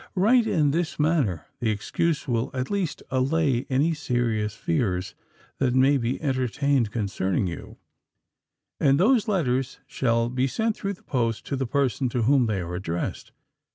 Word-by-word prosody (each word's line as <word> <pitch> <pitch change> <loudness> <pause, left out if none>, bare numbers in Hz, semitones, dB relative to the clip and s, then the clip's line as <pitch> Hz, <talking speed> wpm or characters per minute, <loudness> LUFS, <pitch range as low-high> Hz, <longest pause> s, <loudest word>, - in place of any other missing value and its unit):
Write 225 +5 +4
in 150 -8 +2
this 165 +2 -1
manner—the 130 - 0
excuse 145 +9 -1
will 120 -1 0
at 130 +5 -3
least 190 -7 -2
allay 135 0 +1
any 140 +5 +2
serious 115 -7 -1
fears 115 - -1 0.5
that 130 -2 +1
may 135 +2 +5
be 125 -1 -1
entertained 135 -2 +1
concerning 95 -4 -1
you; 85 -2 -7 1.0
and 140 +1 +3
those 230 +4 +3
letters 135 - 0
shall 115 -2 0
be 125 +2 0
sent 220 - -1
through 200 0 -3
the 180 - -17
post 115 -4 -1
to 140 - -2
the 135 -1 -2
persons 135 -2 0
to 120 -1 0
whom 130 0 +4
they 100 -4 -1
are 85 0 -5
addressed. 85 -2 -4
130 Hz, 155 wpm, -25 LUFS, 115-150 Hz, 1.0 s, may